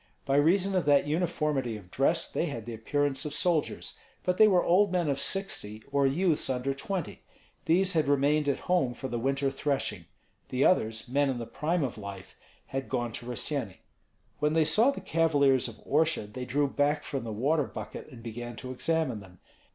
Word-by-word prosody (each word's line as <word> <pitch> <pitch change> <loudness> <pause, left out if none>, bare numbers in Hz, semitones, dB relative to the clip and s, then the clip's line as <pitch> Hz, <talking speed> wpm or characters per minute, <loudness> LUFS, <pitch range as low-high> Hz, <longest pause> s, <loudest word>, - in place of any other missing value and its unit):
By 135 0 +2
reason 185 +6 +3
of 180 - +1
that 145 -1 +4
uniformity 150 -6 -1
of 95 -3 -15
dress 150 +5 +2
they 170 - -1
had 115 -8 -5
the 120 - -6
appearance 140 +4 -1
of 150 -1 -4
soldiers. 165 -2 -1 0.2
But 180 0 0
they 215 - +8
were 185 -4 +4
old 190 +3 +4
men 180 -3 +1
of 140 -2 0
sixty 110 - -2
or 140 -1 +3
youths 160 +2 +1
under 130 +1 -1
twenty. 180 +6 -4 0.4
These 185 +3 +3
had 155 -4 +2
remained 145 +1 +2
at 140 - -1
home 175 -9 +1
for 130 - -5
the 120 -2 -3
winter 135 +2 0
threshing; 135 - -2 0.4
the 130 +2 +1
others, 110 -9 +2
men 140 +3 +2
in 130 - -1
the 120 - -4
prime 160 +6 -1
of 125 -5 -3
life, 100 -2 -9 0.3
had 135 0 -4
gone 120 -3 -1
to 120 +2 -8
Rossyeni. 125 -4 -3 0.6
When 150 +1 +1
they 160 -1 +3
saw 215 - +4
the 280 - -3
cavaliers 145 -6 +3
of 115 - -8
Orsha, 155 -5 +2
they 125 +5 -7
drew 140 +3 +1
back 145 +2 +1
from 135 -4 -4
the 115 - -5
water 140 +7 +1
bucket - - -8
and 120 -5 -12
began 120 +1 -6
to 130 +2 -7
examine 150 -3 0
them. 95 -3 -15
140 Hz, 195 wpm, -29 LUFS, 120-160 Hz, 0.6 s, they